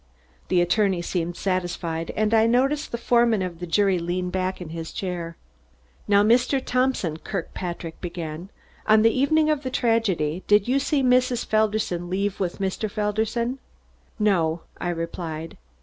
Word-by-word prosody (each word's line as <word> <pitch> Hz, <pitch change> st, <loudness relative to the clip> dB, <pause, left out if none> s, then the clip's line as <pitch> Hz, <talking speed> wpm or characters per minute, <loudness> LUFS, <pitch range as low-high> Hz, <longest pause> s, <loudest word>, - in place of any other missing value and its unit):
The 180 Hz, -1 st, +3 dB
attorney 185 Hz, 0 st, +2 dB
seemed 175 Hz, -1 st, -2 dB
satisfied 175 Hz, -3 st, -2 dB
and 215 Hz, +1 st, +1 dB
I 225 Hz, 0 st, +5 dB
noticed 270 Hz, +5 st, +1 dB
the 235 Hz, -, -2 dB
foreman 235 Hz, -3 st, +3 dB
of 175 Hz, -2 st, -5 dB
the 175 Hz, -, -5 dB
jury 195 Hz, +1 st, +2 dB
lean 180 Hz, +1 st, -2 dB
back 185 Hz, 0 st, -2 dB
in 175 Hz, -3 st, -7 dB
his 165 Hz, 0 st, -6 dB
chair. 175 Hz, -3 st, -4 dB, 0.7 s
"Now, 200 Hz, 0 st, +5 dB
Mr. 245 Hz, +5 st, +3 dB
Thompson," 255 Hz, -11 st, 0 dB
Kirkpatrick 170 Hz, -2 st, -5 dB
began, 170 Hz, 0 st, -6 dB, 0.4 s
"on 215 Hz, 0 st, +6 dB
the 225 Hz, -, +5 dB
evening 310 Hz, +4 st, +3 dB
of 300 Hz, -2 st, 0 dB
the 260 Hz, -, -3 dB
tragedy 195 Hz, -10 st, 0 dB
did 210 Hz, 0 st, +4 dB
you 265 Hz, +3 st, +2 dB
see 280 Hz, 0 st, +1 dB
Mrs. 250 Hz, -1 st, +2 dB
Felderson 215 Hz, -5 st, 0 dB
leave 195 Hz, +2 st, -1 dB
with 180 Hz, -3 st, -2 dB
Mr. 195 Hz, +2 st, -2 dB
Felderson?" 220 Hz, +4 st, -1 dB, 0.6 s
"No," 170 Hz, -7 st, +1 dB, 0.2 s
I 175 Hz, -, -2 dB
replied. 165 Hz, -1 st, -5 dB
195 Hz, 150 wpm, -24 LUFS, 175-230 Hz, 0.7 s, on